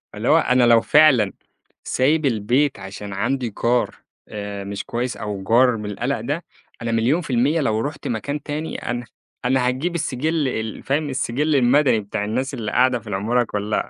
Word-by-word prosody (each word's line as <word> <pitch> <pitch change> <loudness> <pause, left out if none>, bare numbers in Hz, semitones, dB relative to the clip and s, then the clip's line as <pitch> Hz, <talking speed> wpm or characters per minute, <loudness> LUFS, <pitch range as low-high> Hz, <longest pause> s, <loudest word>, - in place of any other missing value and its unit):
اللي - - -4
هو - - +6
أنا 125 0 +3
لو 115 -1 +6
فعلًا 135 -10 +5 0.5
سايب 150 +4 +1
البيت 125 +3 +1
عشان 100 +1 -7
عندي 120 +4 -1
جار 120 +1 +2 0.3
آآ، 100 -1 -5
مش 100 0 -5
كويس 120 +1 -3
أو 105 -2 -5
جار 120 +4 +4
من 105 - -6
القلق 120 +3 -2
ده 145 +8 -3 0.4
أنا 115 0 -2
مليون 120 +10 +2
في - - -10
المِيَّة 145 +7 +2
لو 110 -5 +1
رُحت 145 +6 -4
مكان 140 +6 -3
تاني 155 +2 -4
أنا 120 0 -3 0.4
أنا 125 0 +2
هاجيب 140 +8 -1
السجِّل 155 0 -1
ال 110 -3 -4
فاهم 145 +2 0
السجِّل 140 +3 0
المدني 130 -2 +4
بتاع 100 0 -4
الناس 130 +6 -2
اللي 110 -5 -4
قاعدة 125 -1 +3
في 115 - -17
العمارة 105 +5 +1
كلها، 105 -1 -2
125 Hz, 175 wpm, -21 LUFS, 110-140 Hz, 0.5 s, هو